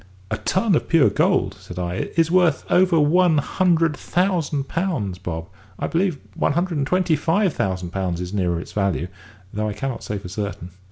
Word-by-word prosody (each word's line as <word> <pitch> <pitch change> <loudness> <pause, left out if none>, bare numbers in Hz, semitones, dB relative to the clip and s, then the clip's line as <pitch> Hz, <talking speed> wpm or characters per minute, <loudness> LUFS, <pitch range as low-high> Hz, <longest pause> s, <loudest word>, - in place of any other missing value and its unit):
"A 110 - 0
ton 190 - +1
of 155 - 0
pure 165 -5 +5
gold," - - +1
said 90 - -10
I, 90 0 -2
"is 165 0 +3
worth 180 -2 +3
over 180 -2 +4
one 160 +2 +4
hundred 165 +1 +2
thousand 165 -7 0
pounds, 130 - -2
Bob; 80 -3 -5 0.3
I - - -2
believe 175 -2 0 0.2
one - - 0
hundred 170 -1 0
and 135 - 0
twenty 180 -1 +2
five 170 +4 +1
thousand 90 -2 -2
pounds 90 -3 -2
is 90 +1 -5
nearer 90 -4 0
its - - -9
value; 100 -4 -1 0.4
though 105 +1 -1
I - - -3
cannot 130 +2 -4
say 105 - -3
for 95 - -8
certain." 95 -2 -5
145 Hz, 185 wpm, -22 LUFS, -, 0.4 s, pure